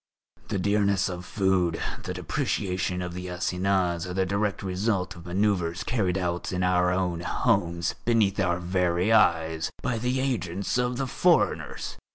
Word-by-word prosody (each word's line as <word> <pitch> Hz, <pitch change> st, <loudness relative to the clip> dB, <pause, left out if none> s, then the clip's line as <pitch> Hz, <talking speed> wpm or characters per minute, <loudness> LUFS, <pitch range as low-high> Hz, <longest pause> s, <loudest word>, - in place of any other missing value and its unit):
The -, -, -2 dB
dearness 100 Hz, 0 st, +2 dB
of 90 Hz, 0 st, -6 dB
food, 95 Hz, -5 st, +1 dB, 0.2 s
the -, -, -5 dB
depreciation 90 Hz, -2 st, -1 dB
of 90 Hz, -1 st, -5 dB
the 90 Hz, +1 st, -6 dB
assignats 90 Hz, -1 st, 0 dB
are 90 Hz, -, -5 dB
the 95 Hz, 0 st, +2 dB
direct 100 Hz, +2 st, -1 dB
result 95 Hz, 0 st, -1 dB
of 85 Hz, 0 st, -12 dB
manoeuvres 90 Hz, -2 st, 0 dB
carried 95 Hz, -7 st, 0 dB
out 90 Hz, -2 st, -2 dB
in 90 Hz, 0 st, -1 dB
our 90 Hz, -1 st, +3 dB
own 90 Hz, -2 st, 0 dB
homes, 85 Hz, 0 st, 0 dB
beneath 110 Hz, -4 st, +2 dB
our 90 Hz, -3 st, +2 dB
very 90 Hz, +2 st, +1 dB
eyes, 80 Hz, -6 st, +3 dB
by 115 Hz, -2 st, -1 dB
the 125 Hz, +3 st, 0 dB
agents 110 Hz, -6 st, -1 dB
of 125 Hz, 0 st, 0 dB
the 135 Hz, -, -1 dB
foreigners. 125 Hz, -, +1 dB
90 Hz, 155 wpm, -26 LUFS, 90-100 Hz, 0.2 s, our